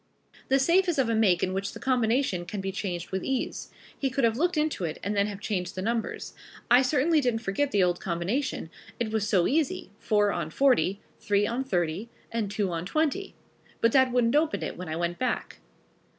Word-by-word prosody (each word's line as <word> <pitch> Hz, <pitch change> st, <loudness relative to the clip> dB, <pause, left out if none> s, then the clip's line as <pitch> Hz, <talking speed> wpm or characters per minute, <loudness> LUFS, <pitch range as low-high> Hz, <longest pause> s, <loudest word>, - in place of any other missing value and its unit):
The 270 Hz, -, +4 dB
safe 350 Hz, +7 st, +3 dB
is 335 Hz, -, 0 dB
of 260 Hz, -4 st, +2 dB
a -, -, +2 dB
make 200 Hz, -6 st, +3 dB
in 185 Hz, -, 0 dB
which 195 Hz, +1 st, -3 dB
the -, -, -8 dB
combination 245 Hz, -6 st, +1 dB
can 205 Hz, +3 st, -4 dB
be 195 Hz, 0 st, -3 dB
changed 180 Hz, -3 st, -4 dB
with 190 Hz, 0 st, -2 dB
ease. 265 Hz, -1 st, -2 dB, 0.3 s
He 270 Hz, -, -1 dB
could 260 Hz, +1 st, -1 dB
have 225 Hz, -1 st, +3 dB
looked 345 Hz, +5 st, +1 dB
into 300 Hz, -10 st, 0 dB
it 160 Hz, -2 st, -2 dB
and 205 Hz, +2 st, -1 dB
then 200 Hz, 0 st, +2 dB
have 205 Hz, -2 st, -6 dB
changed 180 Hz, -4 st, -3 dB
the 185 Hz, -, -3 dB
numbers. 230 Hz, +1 st, -2 dB, 0.4 s
I 245 Hz, +1 st, +8 dB
certainly 295 Hz, +4 st, +3 dB
didn't 235 Hz, -3 st, 0 dB
forget 230 Hz, +9 st, 0 dB
the 200 Hz, -5 st, +3 dB
old 175 Hz, -1 st, +1 dB
combination 180 Hz, -, -2 dB, 0.3 s
it 225 Hz, -2 st, -1 dB
was 220 Hz, -1 st, 0 dB
so 185 Hz, -6 st, +3 dB
easy, 290 Hz, -8 st, 0 dB
four 210 Hz, -1 st, +2 dB
on 165 Hz, -4 st, -3 dB
forty, 240 Hz, -, +2 dB, 0.2 s
three 205 Hz, 0 st, +2 dB
on 240 Hz, +5 st, -1 dB
thirty 180 Hz, -2 st, -1 dB, 0.2 s
and 225 Hz, -3 st, -1 dB
two 200 Hz, -2 st, -1 dB
on 165 Hz, -1 st, -3 dB
twenty 315 Hz, -, -1 dB, 0.4 s
but 230 Hz, -, +3 dB
that 260 Hz, -1 st, +4 dB
wouldn't 245 Hz, 0 st, +2 dB
open 310 Hz, +1 st, +1 dB
it -, -, -4 dB
when 180 Hz, -2 st, -7 dB
I 155 Hz, -, -2 dB
went 175 Hz, +1 st, -2 dB
back." 255 Hz, -, -2 dB
220 Hz, 210 wpm, -27 LUFS, 190-265 Hz, 0.4 s, I